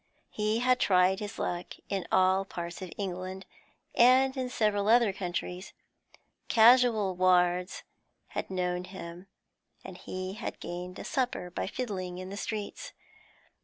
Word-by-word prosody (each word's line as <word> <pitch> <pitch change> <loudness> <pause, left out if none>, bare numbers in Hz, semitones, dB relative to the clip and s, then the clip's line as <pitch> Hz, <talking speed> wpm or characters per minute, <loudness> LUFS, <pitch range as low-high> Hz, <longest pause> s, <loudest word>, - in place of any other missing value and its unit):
He 215 +2 0
had 255 0 +3
tried 185 0 +3
his 205 -2 -6
luck 175 0 -3
in 195 -3 -3
all 185 +1 +4
parts 175 -2 -7
of 185 -2 -7
England 185 -1 -5 0.5
and 260 +2 +5
in 255 -2 -2
several 210 -4 +1
other 230 -3 +5
countries; 180 0 -5 0.7
casual 225 -4 +5
wards 180 0 +2 0.5
had - - -4
known 180 -1 -2
him, 180 -1 -9 0.6
and 190 - -9
he 185 0 -5
had 210 - -6
gained 180 +1 -6
a - - -7
supper 245 -9 -2
by - - -3
fiddling 190 -6 -4
in 185 +1 -7
the - - -5
streets. 210 -1 -5
190 Hz, 135 wpm, -29 LUFS, 180-215 Hz, 0.7 s, and